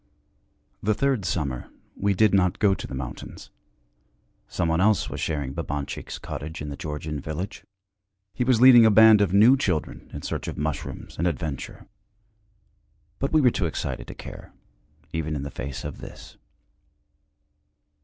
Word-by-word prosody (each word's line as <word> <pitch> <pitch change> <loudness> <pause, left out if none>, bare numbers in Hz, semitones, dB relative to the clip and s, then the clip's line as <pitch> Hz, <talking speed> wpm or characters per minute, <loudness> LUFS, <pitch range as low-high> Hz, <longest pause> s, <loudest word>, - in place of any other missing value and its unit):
II - - -43
The 110 - +4
third 135 -4 0
summer 70 -8 -2 0.3
we 100 0 0
did 105 +1 +4
not 90 -2 +3
go 100 -3 +3
to - - -5
the - - -6
mountains. 65 -1 -8 1.0
Some 85 - -1
one 80 +2 +1
else 105 +1 +2
was - - -5
sharing 70 -4 -2
Babanchik's 70 0 -4
cottage 80 +3 -7
in 75 - -5
the 70 - -5
Georgian 75 -2 -5
village; 80 +7 -5 0.7
he 125 - -1
was 125 -2 +3
leading 125 -2 +9
a 110 - +7
band 110 0 +7
of 100 -4 +2
new 110 +7 +7
children 90 - -2
in - - -7
search - - -4
of - - -5
mushrooms 75 -1 -5
and 85 - +2
adventure. 80 -4 -4 1.3
But 135 - -1
we 155 - +4
were 125 -3 +5
too 90 - -1
excited - - -4
to - - -8
care, - - -10 0.6
even 80 -1 -2
in 70 - -3
the 70 - -6
face 65 +1 -6
of - - -6
this. - - -11
85 Hz, 165 wpm, -25 LUFS, 75-110 Hz, 1.3 s, leading